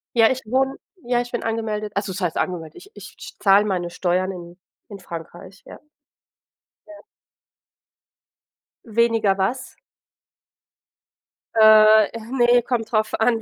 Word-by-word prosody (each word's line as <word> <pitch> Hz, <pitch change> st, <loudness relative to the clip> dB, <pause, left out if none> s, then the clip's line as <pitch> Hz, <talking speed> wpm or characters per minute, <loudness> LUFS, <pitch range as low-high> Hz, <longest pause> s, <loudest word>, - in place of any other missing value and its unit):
Ja, 225 Hz, -1 st, +5 dB
ich 260 Hz, 0 st, -3 dB
wohne 265 Hz, +4 st, 0 dB, 0.3 s
ja, 240 Hz, 0 st, 0 dB
ich 240 Hz, 0 st, -8 dB
bin 240 Hz, -, -4 dB
angemeldet, 220 Hz, -2 st, -3 dB
also 200 Hz, -1 st, -2 dB
was 185 Hz, -, -7 dB
heißt 175 Hz, -3 st, -2 dB
angemeldet. 165 Hz, -4 st, -4 dB
Ich 405 Hz, -, -15 dB
ich -, -, -12 dB
scht -, -, -12 dB
zahle 200 Hz, +1 st, +5 dB
meine 180 Hz, -4 st, -2 dB
Steuern 185 Hz, +2 st, -1 dB
in 175 Hz, -1 st, -11 dB, 0.3 s
in 200 Hz, -2 st, -10 dB
Frankreich, 180 Hz, +2 st, -11 dB
ja. -, -, -12 dB, 1.1 s
Ja. 315 Hz, -, -13 dB, 1.9 s
Weniger 225 Hz, -3 st, +1 dB
was? 200 Hz, +7 st, -3 dB, 1.8 s
Äh, 215 Hz, -1 st, +7 dB
äh, 230 Hz, -, -7 dB
ne, 245 Hz, -2 st, +3 dB
kommt 235 Hz, -2 st, -3 dB
darauf 215 Hz, -2 st, 0 dB
an, 225 Hz, 0 st, +1 dB
215 Hz, 135 wpm, -21 LUFS, 190-235 Hz, 1.9 s, Äh